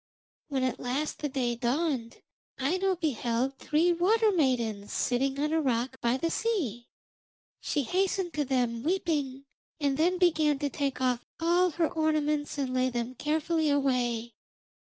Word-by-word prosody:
When 270 -3 -1
at 255 -2 -1
last 270 +5 -2
the 295 - -2
day 255 -3 0
dawned 245 0 -1 0.4
Aino 370 +8 +1
beheld 265 -4 -1
three 330 +4 +2
water 425 +6 +3
maidens 235 - 0
sitting 270 +2 0
on 300 +2 0
a 320 - +2
rock 260 -1 -1
by 235 +2 +2
the 330 +4 -1
sea. 275 - -1 0.7
She 290 - -1
hastened 370 - 0
to 300 - 0
them, 245 -4 0
weeping, 290 -5 -1 0.3
and 280 -2 +1
then 350 +4 +2
began 315 -5 +3
to 285 0 -2
take 275 -2 -2
off 250 -2 0
all 350 +2 +3
her 335 0 0
ornaments 305 -2 0
and 265 -2 -2
lay 255 0 +2
them 240 0 -3
carefully 315 +3 0
away. 245 -5 0
285 Hz, 150 wpm, -29 LUFS, 250-325 Hz, 0.7 s, water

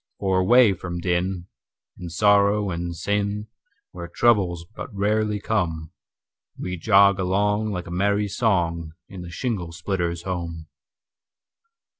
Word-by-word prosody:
For 95 -1 +1
away 115 +2 +5
from 90 -1 -6
din, 90 +1 -1 0.5
and 85 -2 -7
sorrow 100 +2 +3
and 85 0 -4
sin, 105 +3 -2 0.4
Where 85 -1 -7
troubles 90 -4 +2
but - - -7
rarely 105 +1 0
come, 85 -7 -2 0.7
We 90 0 -4
jog 100 +1 +4
along, 105 +3 +1
like 90 -4 -4
a 85 - -9
merry 100 +3 +1
song, 85 -7 0 0.2
In 95 -2 -9
the 90 - -8
shingle 90 -3 -3
splitter's 85 -1 -3
home. 85 -3 -5
95 Hz, 125 wpm, -23 LUFS, 85-105 Hz, 0.7 s, away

